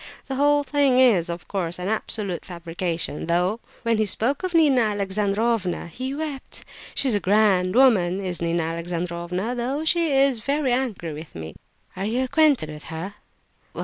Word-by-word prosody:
The 270 - -5
whole 290 +2 +3
thing 280 -2 +2
is, 215 -10 +4
of 170 0 -6
course, 175 -4 -3
an 180 +1 -4
absolute 205 -4 -2
fabrication, 170 -3 -4
though 180 +6 +1 0.2
when 230 -2 +1
he 215 - +2
spoke 240 +8 0
of 370 -2 -3
Nina 290 -6 +5
Alexandrovna 205 -1 0
he 255 +10 -5
wept! 295 -3 -5 0.3
She's 265 -4 +1
a 205 - +2
grand 195 -2 +3
woman, 200 -9 +4
is 185 -3 -3
Nina 170 0 0
Alexandrovna, 170 +5 -3
though 260 +6 -2
she 335 -1 +2
is 270 -3 +3
very 280 +3 0
angry 220 -11 -2
with 155 +1 -10
me!" 80 0 -7 0.4
"Are 190 - -3
you 240 +5 0
acquainted 275 - +3
with 150 0 -10
her?" 165 +5 -6
210 Hz, 160 wpm, -24 LUFS, 175-260 Hz, 0.4 s, Nina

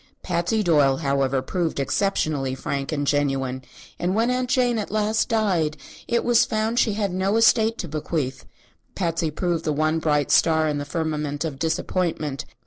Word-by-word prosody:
Patsy 180 +5 0
Doyle, 145 -6 +3
however, 135 -3 0
proved 170 0 -2
exceptionally 140 -4 0
frank 135 +1 -3
and 145 -2 -1
genuine, 135 -3 0 0.4
and 180 +2 0
when 230 +3 +2
Aunt 250 0 -1
Jane 245 -3 +2
at 210 - -4
last 215 +1 0
died 185 -9 +1
and - - -21 0.3
it 235 0 +1
was 240 -1 +5
found 220 +2 0
she 220 -4 +2
had 200 -3 -1
no 190 +3 +1
estate 225 0 +4
to 175 - -4
bequeath, 150 -3 -3 0.5
Patsy 165 -3 -1
proved 170 +1 -2
the 155 - 0
one 155 +2 +1
bright 150 -3 +1
star 160 -1 +4
in 150 -1 -1
the 145 - -4
firmament 150 -1 -2
of 140 -4 -5
disappointment. 160 -3 -2
160 Hz, 170 wpm, -23 LUFS, 145-210 Hz, 0.5 s, was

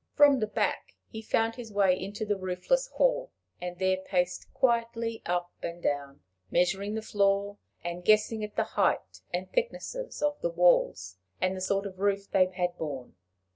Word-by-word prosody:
From 290 -2 +7
the 215 - 0
back - - -1
he 220 - -7
found 225 +1 +1
his 235 -3 -8
way 200 -2 +4
into 200 +4 -5
the 205 -1 +1
roofless 185 - 0
hall, - - +1 0.3
and 180 0 -5
there 190 0 +2
paced 180 -1 -1
quietly 230 -2 0
up 175 0 -1
and 170 0 -5
down, 145 -3 -2 0.3
measuring 195 - +1
the 220 - -3
floor, 200 -1 +1 0.2
and 175 +1 -4
guessing 215 +2 +3
at 210 0 -6
the - - +2
height - - 0
and 180 +1 -2
thickness 485 0 -1
of 295 -12 -2
the 170 - +1
walls, 165 - +3 0.2
and 185 +1 +1
the 185 - -6
sort 195 +2 0
of 190 -2 -7
roof 200 0 0
they 185 -1 +5
had 180 -1 -2
borne. 135 -6 -5
195 Hz, 175 wpm, -29 LUFS, 180-225 Hz, 0.3 s, From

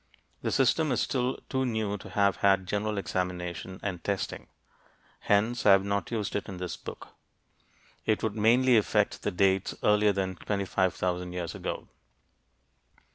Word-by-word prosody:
The - - -1
system 140 +3 +3
is 125 - +1
still 125 -1 0
too 130 -1 0
new 110 -4 -1
to - - -10
have 100 -1 +2
had 95 -1 +3
general 105 +2 -1
examination 90 -1 -3
and 90 -5 -4
testing. 100 -3 -3 0.7
Hence, 110 +4 +1
I 100 - +7
have 95 0 +4
not 100 -2 -1
used 110 -4 -2
it 105 - -3
in 95 - -6
this 90 -1 -4
book; - - -9 1.0
it 110 - +1
would 110 -2 -1
mainly 120 +3 +4
affect 105 -1 +1
the - - 0
dates 95 0 +1
earlier 105 0 +4
than 95 -2 -2
25,000 90 -2 -1
years 90 -2 -4
ago. - - -5
100 Hz, 150 wpm, -28 LUFS, 95-110 Hz, 1.0 s, I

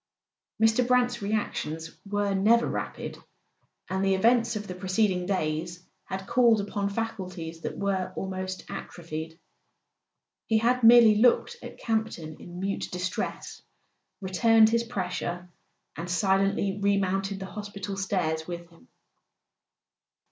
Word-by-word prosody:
Mr. 225 +2 +3
Brant's 245 -1 +2
reactions 165 -6 -2 0.2
were 205 0 0
never 220 +5 +4
rapid, - - -4 0.7
and 190 +1 -1
the 195 0 +3
events 235 +3 +3
of 210 0 -4
the 185 - -6
preceding 185 0 0
days 175 -1 -2 0.2
had 190 0 -5
called 235 -1 +4
upon 200 0 -2
faculties 185 -7 -5
that - - -5
were 195 -2 -1
almost 185 0 -4
atrophied. 160 -1 -7 1.1
He 220 - +3
had 245 +3 +2
merely 230 -1 +8
looked 245 - +3
at - - -9
Campton 220 -9 -2
in 175 0 -9
mute 195 +1 -2
distress, 180 +1 -4 0.6
returned 220 +4 +5
his 230 +1 +2
pressure, 180 -5 -4 0.4
and 170 +2 -6
silently 195 +1 +1
remounted 195 -1 +1
the 190 - -5
hospital 200 0 -6
stairs 175 -5 -1
with 170 -1 -7
him. 165 - -21
195 Hz, 120 wpm, -27 LUFS, 180-220 Hz, 1.1 s, merely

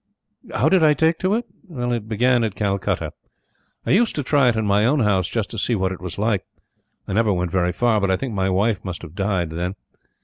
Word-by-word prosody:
How - - +2
did 185 -4 +4
I 150 -1 +5
take 160 +1 +2
to 190 +2 +1
it? 235 +1 -2 0.2
It 120 -7 -3
began 120 +2 +2
at 110 -3 -2
Calcutta. 100 -2 -1 0.7
I - - 0
used 225 +4 +3
to 145 - -2
try 140 -1 +3
it 115 - 0
in 110 -1 -1
my 100 +1 +3
own 130 +5 +2
house, 95 -5 +2
just 110 -3 -3
to 115 - -4
see 120 - +1
what 95 -2 0
it 90 - -7
was 90 0 -6
like. 105 -1 0 0.6
I - - -3
never 110 +1 +2
went 90 -2 -1
very 90 -1 +1
far, 115 0 +1
but 100 - +1
I 95 - +2
think 130 0 -4
my 95 -1 0
wife 100 +3 +1
must 90 -3 -6
have 80 -2 -10
died 95 -4 -1
then. 90 +3 -3
105 Hz, 235 wpm, -22 LUFS, 95-125 Hz, 0.7 s, I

